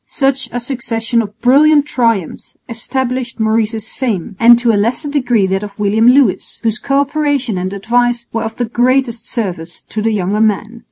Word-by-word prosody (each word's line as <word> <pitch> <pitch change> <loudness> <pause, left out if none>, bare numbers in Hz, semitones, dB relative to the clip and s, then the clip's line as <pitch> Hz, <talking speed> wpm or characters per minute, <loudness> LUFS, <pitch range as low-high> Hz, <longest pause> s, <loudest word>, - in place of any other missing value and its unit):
Such 270 -1 -1
a 245 - -3
succession 235 -2 -2
of 210 0 -8
brilliant 290 +3 +5
triumphs 230 - -2
established 250 +1 -3
Maurice's 220 0 0
fame, 205 -8 -3
and 235 0 +7
to 240 -1 +2
a - - 0
lesser 230 +8 0
degree 245 -8 +1
that 190 +1 -1
of 205 -1 -8
William 210 +2 +2
Lewis, 250 -5 +2
whose 225 0 0
co 275 +2 0
operation 285 -5 0
and 185 +1 -3
advice 240 +4 0
were 225 - -1
of 220 0 -4
the 245 - -2
greatest 240 0 0
service 180 -8 -5
to 215 - -5
the 225 +1 +1
younger 205 +1 -1
man. 220 +2 0
230 Hz, 175 wpm, -15 LUFS, 215-255 Hz, -, and